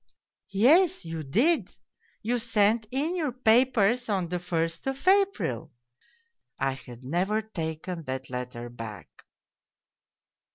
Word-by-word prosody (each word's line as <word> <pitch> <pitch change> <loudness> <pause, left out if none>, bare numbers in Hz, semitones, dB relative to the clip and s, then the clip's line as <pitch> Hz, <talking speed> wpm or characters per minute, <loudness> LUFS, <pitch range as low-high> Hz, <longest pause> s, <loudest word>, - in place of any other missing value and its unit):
' - - -62 0.2
Yes, 350 - +5
you 165 -1 -4
did 235 - +2 0.5
you 240 +3 0
sent 220 -1 +2
in 290 +8 -1
your 310 -6 -1
papers 245 -1 +3
on 190 -4 0
the 180 0 -2
first 165 +2 -2
of 270 +5 -4
April/ 375 - +2 0.9
(I 135 - +1
had 130 -2 -10
never 185 +9 0
taken 165 -3 -5
that 130 0 -4
letter 125 -1 -5
back 110 -7 -8
195 Hz, 120 wpm, -27 LUFS, 150-250 Hz, 0.9 s, Yes